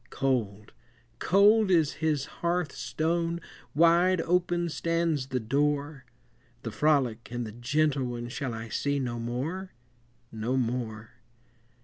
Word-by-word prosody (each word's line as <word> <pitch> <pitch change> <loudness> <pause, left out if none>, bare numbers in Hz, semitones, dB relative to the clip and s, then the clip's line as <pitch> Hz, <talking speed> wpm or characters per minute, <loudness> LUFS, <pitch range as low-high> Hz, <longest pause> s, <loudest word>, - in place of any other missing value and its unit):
Cold, 110 -6 -1 0.5
cold 205 +2 +5
is 165 -5 +3
his 150 -3 +1 0.2
hearth 175 -2 0
stone, 170 +1 -1 0.4
Wide 170 +3 +5
open 175 0 +1
stands 165 -4 -1
the 130 -1 -1
door; 140 +3 -1 0.6
The 115 - -4
frolic 130 -5 +1
and 120 -1 -3
the 110 - -7
gentle 135 +4 0
one 120 -1 -4
Shall 130 -2 -4
I 115 0 -7
see 140 +5 -1
no 120 -3 -2
more, 145 +11 -4 0.6
no 115 +4 -2
more? 115 -3 -3
140 Hz, 120 wpm, -28 LUFS, 120-170 Hz, 0.6 s, cold